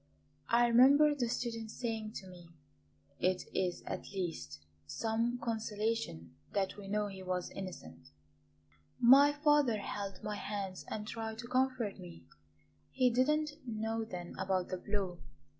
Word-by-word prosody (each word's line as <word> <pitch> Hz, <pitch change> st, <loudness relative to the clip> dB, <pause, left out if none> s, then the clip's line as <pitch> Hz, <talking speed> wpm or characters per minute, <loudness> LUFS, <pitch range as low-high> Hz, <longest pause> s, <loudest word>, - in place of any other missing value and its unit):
I 240 Hz, +1 st, +5 dB
remember 275 Hz, +6 st, +7 dB
the 250 Hz, -5 st, -1 dB
student 230 Hz, -2 st, -3 dB
saying 220 Hz, -2 st, -3 dB
to 190 Hz, -, -7 dB
me: 175 Hz, -2 st, -13 dB, 0.7 s
'It 185 Hz, 0 st, +1 dB
is 180 Hz, -2 st, -1 dB
at -, -, -5 dB
least 85 Hz, -, -4 dB, 0.2 s
some 225 Hz, -, 0 dB
consolation 220 Hz, -, -2 dB, 0.2 s
that 195 Hz, -1 st, 0 dB
we 205 Hz, -1 st, -9 dB
know 210 Hz, +1 st, 0 dB
he 195 Hz, -2 st, -7 dB
was 185 Hz, -1 st, -2 dB
innocent' 85 Hz, -, -8 dB, 0.9 s
My 270 Hz, +4 st, +8 dB
father 290 Hz, -5 st, +3 dB
held 200 Hz, -2 st, -5 dB
my 210 Hz, -1 st, -3 dB
hands 200 Hz, -3 st, -4 dB
and 210 Hz, -1 st, -4 dB
tried 225 Hz, -1 st, -4 dB
to 235 Hz, +1 st, -7 dB
comfort 255 Hz, -4 st, 0 dB
me; 85 Hz, -1 st, -11 dB, 0.6 s
he 255 Hz, -1 st, +3 dB
did 255 Hz, +3 st, +3 dB
not 305 Hz, 0 st, +2 dB, 0.2 s
know 225 Hz, 0 st, -2 dB
then 180 Hz, -5 st, -7 dB
about 190 Hz, -1 st, 0 dB
the 185 Hz, -, -2 dB
blow. 190 Hz, -2 st, -2 dB
215 Hz, 140 wpm, -34 LUFS, 185-235 Hz, 0.9 s, My